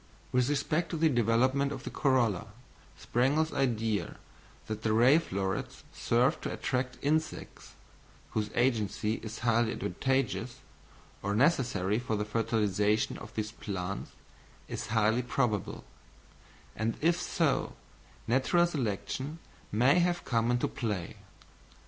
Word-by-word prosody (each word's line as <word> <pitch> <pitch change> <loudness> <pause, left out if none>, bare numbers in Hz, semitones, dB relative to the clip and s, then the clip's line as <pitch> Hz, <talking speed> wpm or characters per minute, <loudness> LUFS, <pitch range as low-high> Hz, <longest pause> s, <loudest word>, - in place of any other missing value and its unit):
With 125 +1 +2
respect 155 +4 0
to 165 - -3
the 160 0 +4
development 130 +3 +2
of 135 -3 -6
the - - -5
corolla, 120 -8 +1 0.5
Sprengel's 145 +6 +1
idea 115 -7 0 0.5
that 110 0 -5
the 110 -1 +1
ray 125 +8 +6
florets 95 - -3
serve - - +2
to - - -3
attract 125 -1 -2
insects, 155 +2 -2 0.6
whose 105 -1 -1
agency 110 -3 +1
is 110 0 -6
highly 115 0 +3
advantageous, 130 -1 -1 0.6
or 100 +1 -1
necessary 115 - +2
for 120 -3 -2
the 105 0 -1
fertilisation 105 -1 +1
of - - -11
these 110 -1 -2
plants, 100 -4 -5 0.6
is - - -5
highly 110 +2 +2
probable; 120 -4 -1 0.9
and 110 +2 -1
if 170 +3 +2
so, 155 -6 0 0.5
natural 135 +8 +3
selection 135 - -3 0.3
may 125 - +4
have 175 0 +1
come 115 -1 +1
into 120 0 +1
play. 105 -8 -4
120 Hz, 120 wpm, -30 LUFS, 110-135 Hz, 0.9 s, ray